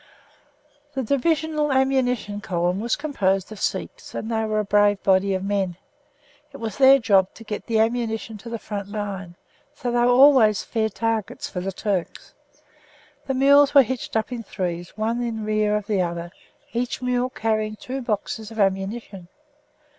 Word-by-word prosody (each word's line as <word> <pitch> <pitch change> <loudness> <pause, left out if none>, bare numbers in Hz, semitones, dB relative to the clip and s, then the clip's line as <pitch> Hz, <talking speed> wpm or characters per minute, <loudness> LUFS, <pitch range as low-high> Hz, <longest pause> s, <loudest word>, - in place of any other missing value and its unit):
'" 290 0 -37
The 265 - -1
Divisional 300 +3 0
Ammunition 255 -6 +1
Column 175 0 -1
was 235 +3 0
composed 195 - -1
of 215 - -8
Sikhs, - - -4
and 225 - -4
they 220 -1 0
were 215 0 -1
a 215 - +2
brave 205 0 +3
body 190 0 +3
of 185 - -3
men. 195 -3 -1 0.7
It 275 - -10
was 225 -2 -5
their 270 0 +8
job 200 -7 +3
to 225 - -11
get 210 -1 -6
the 225 - +1
ammunition 225 -1 -1
to 230 - -9
the 230 - -3
front 200 -2 -6
line, 200 -4 -5 0.4
so 245 - -3
that 240 - +1
they - - +3
were - - +4
always 250 -5 +6
fair 220 -2 -1
targets 225 -1 -2
for 180 - -3
the 190 +2 -3
Turks. 195 -2 -3 0.9
The 270 - -1
mules 280 +2 +5
were 275 - +9
hitched 245 -1 -3
up 220 +3 -2
in 240 -2 -4
threes, 175 -3 -5
one 225 +3 -1
in 225 -3 -3
rear 215 -1 +1
of 210 -1 -2
the 205 -3 +1
other, 170 -1 -3 0.4
each 245 +1 -2
mule 250 0 0
carrying 215 -3 -1
two 260 +5 -6
boxes 220 -1 -3
of 225 -1 -9
ammunition. 195 -1 -1
220 Hz, 175 wpm, -23 LUFS, 200-245 Hz, 0.9 s, were